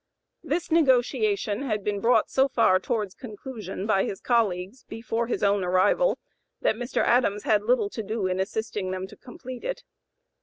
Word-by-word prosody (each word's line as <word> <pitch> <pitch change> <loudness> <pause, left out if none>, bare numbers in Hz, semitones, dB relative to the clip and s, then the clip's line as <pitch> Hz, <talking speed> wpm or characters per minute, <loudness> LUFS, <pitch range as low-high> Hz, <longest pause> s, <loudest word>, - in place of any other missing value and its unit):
This 325 +1 -2
negotiation 275 - +2
had 215 -7 -2
been 205 0 -1
brought 230 +5 +3
so 265 +1 +3
far 225 -8 +3
towards 205 0 -2
conclusion 215 -5 -7
by 195 -3 +2
his 195 - -4
colleagues 215 -1 0
before 230 +1 -3
his 240 - -2
own 200 -1 +3
arrival 185 - +3 0.4
that - - +3
Mr. 245 +3 -1
Adams 220 -4 +2
had 210 -2 +3
little 215 -2 +1
to 225 - -4
do 215 -1 -3
in 185 0 -1
assisting 205 -1 -2
them 185 0 -3
to 190 - -13
complete 250 0 -10
it. - - -4
220 Hz, 165 wpm, -26 LUFS, 200-250 Hz, 0.4 s, brought